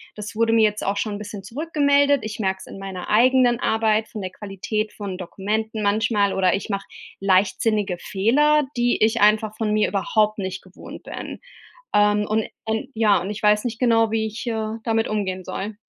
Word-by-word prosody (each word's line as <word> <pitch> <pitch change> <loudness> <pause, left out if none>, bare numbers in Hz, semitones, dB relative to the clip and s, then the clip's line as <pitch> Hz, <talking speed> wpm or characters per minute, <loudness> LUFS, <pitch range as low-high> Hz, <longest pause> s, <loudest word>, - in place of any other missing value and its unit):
das 210 0 -7
wurde 230 0 +2
mir 225 - +5
jetzt 210 -1 +1
auch 200 - 0
schon 205 0 -2
'n - - -5
bisschen 205 -1 -8
zurückgemeldet. 285 - +2
Ich 215 0 -6
merke 190 -2 -1
es - - -10
in - - -10
meiner 190 -2 -7
eigenen 245 +1 +4
Arbeit, 220 0 +1
von 210 - -7
der 185 - -5
Qualität 210 +2 -4
von 195 -3 -6
Dokumenten 215 +4 -3
manchmal, 205 -1 +2
oder 185 -1 +2
ich 195 - -5
mache 200 -1 -3 0.3
leichtsinnige 195 0 +1
Fehler, 290 +12 +2
die 240 -2 +2
ich 225 +1 +2
einfach 215 +1 +3
von 215 -2 0
mir 215 - +2
überhaupt 215 +2 +1
nicht 190 -1 -4
gewohnt 185 0 -12
bin. - - -7 0.5
Ähm, 210 0 +3
und 215 +1 0 0.2
und 220 +4 -2
ja, 215 -3 +4
und 190 - -5
ich 210 +1 -6
weiß 210 +2 +3
nicht 225 -2 -3
genau, 225 -3 +3
wie, 220 0 0
ich, 220 +3 -7
äh, 220 -1 -2
damit 225 -1 +1
umgehen 190 -3 -2
soll. 205 +3 -5
215 Hz, 190 wpm, -22 LUFS, 200-225 Hz, 0.5 s, mir